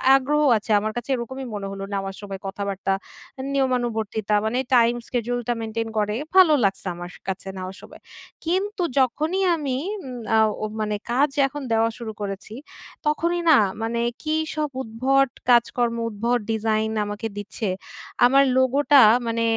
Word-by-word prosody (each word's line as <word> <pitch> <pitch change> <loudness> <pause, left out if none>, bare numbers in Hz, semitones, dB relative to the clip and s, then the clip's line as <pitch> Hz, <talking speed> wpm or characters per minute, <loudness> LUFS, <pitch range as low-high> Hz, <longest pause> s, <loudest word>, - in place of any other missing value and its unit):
আগ্রহ 290 +3 +2 0.2
আছে। 215 +1 -5
আমার 215 +1 -2
কাছে 240 +2 -5
এরকমই 260 +2 -5
মনে 200 -1 -4
হলো 195 0 -6
নেওয়ার 195 0 -3
সময় 195 -2 -7
কথাবার্তা, 195 0 -2 0.6
নিয়মানুবর্তিতা 230 -5 0
মানে 225 +3 0 0.2
টাইম 235 0 +5
schedule 245 0 -2
টা 240 - +2
মেইনটেইন 225 0 -3
করে। 210 0 0 0.2
ভালো 365 -5 +7
লাগছে 195 0 0
আমার 175 0 -7
স - - -13
কাছে 190 0 -4
নেওয়ার 185 +1 -6
সময়। - - -14 0.4
কিন্তু 380 +3 -1 0.2
যখনই 310 +9 +1
আমি 275 -5 -2 0.2
এম 390 - -10 0.3
আ - - +5 0.3
ও - - +1 0.2
মানে 210 -1 -1 0.2
কাজ 280 +4 +3 0.2
এখন 290 +1 -7
দেওয়া 225 0 +3
শুরু 230 -2 -6
করেছি 200 +1 -5 0.5
তখনই 335 +3 +1
না 305 - +8 0.2
মানে 230 +1 -1 0.2
কী 310 0 -1 0.2
সব 305 -1 -1
উদ্ভট 265 +4 +1 0.2
কাজকর্ম, 240 0 +3
উদ্ভট 235 +3 0
ডিজাইন 220 0 0
আমাকে 205 +2 -4
দিচ্ছে। 210 +1 -4 0.6
আমার 275 +3 +6
লোগো 260 +1 +3
টা 280 -2 +9 0.3
মানে 230 0 0
235 Hz, 155 wpm, -23 LUFS, 210-270 Hz, 0.6 s, টা